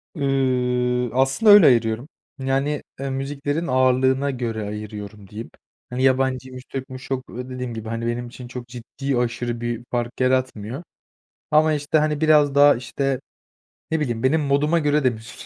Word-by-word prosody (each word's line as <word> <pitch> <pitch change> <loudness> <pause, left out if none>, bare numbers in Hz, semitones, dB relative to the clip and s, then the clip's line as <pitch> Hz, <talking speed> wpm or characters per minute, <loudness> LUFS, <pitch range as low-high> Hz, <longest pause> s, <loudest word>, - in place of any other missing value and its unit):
Iıı, 125 -3 +1
aslında 135 - +4
öyle 205 -4 +9
ayırıyorum, 115 +2 +2 0.3
yani, 135 +2 -1 0.2
eee, 135 0 -3
müziklerin 145 +4 -3
ağırlığına 130 +2 +2
göre 115 -4 -3
ayırıyorum 105 -1 -7
diyeyim, 110 +2 -8 0.4
hani, 125 +1 -2
yabancıymış 130 -1 0
Türk'müş, 130 -1 -6
çok 130 -1 -3
dediğim 125 -1 -6
gibi, 110 0 -6
hani, 115 +1 -3
benim 120 +1 -2
için 120 +1 -10
çok 125 -1 -8
ciddi, 125 +3 -4
aşırı 120 -1 -2
bir 120 0 -3
fark 120 -1 -3
yaratmıyor 130 0 0 0.7
ama, 155 +1 +4
işte, 150 +1 +1
hani, 150 -1 0
biraz 150 -3 +4
daha, 145 0 +7
işte, 130 +2 -2 0.7
ne 160 - +1
bileyim, 120 -5 -2
benim 150 +4 +3
moduma 145 +4 +2
göre 150 -1 +1
de 130 - +5
müzik 110 0 -9
130 Hz, 150 wpm, -22 LUFS, 120-140 Hz, 0.7 s, öyle